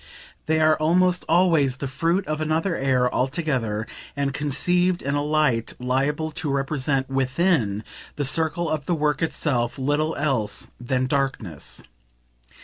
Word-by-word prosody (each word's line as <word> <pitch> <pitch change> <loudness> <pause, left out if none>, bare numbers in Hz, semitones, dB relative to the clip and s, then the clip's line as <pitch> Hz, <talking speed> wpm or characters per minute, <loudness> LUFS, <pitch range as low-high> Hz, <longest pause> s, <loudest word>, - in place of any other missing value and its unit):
They 160 0 +2
are 155 -1 +4
almost 180 +3 +3
always 160 -7 +3
the 140 - -4
fruit 165 +8 0
of 155 0 -3
another 160 +3 0
air 130 -3 +1
altogether 130 -6 -1 0.3
and 140 -1 -1
conceived 175 +6 +1
in 140 - -1
a 145 0 0
light 150 -6 +1
liable 140 +5 0
to 150 0 -3
represent 135 -1 0
WITHIN 135 - +1 0.3
the 145 - -2
circle 160 +4 +1
of 155 -2 -2
the 175 - +2
work 150 -1 0
itself 135 -7 0
little 145 +4 0
else 135 -8 -1
than 125 +1 0
darkness. 130 - -2
145 Hz, 140 wpm, -24 LUFS, 130-160 Hz, 0.3 s, are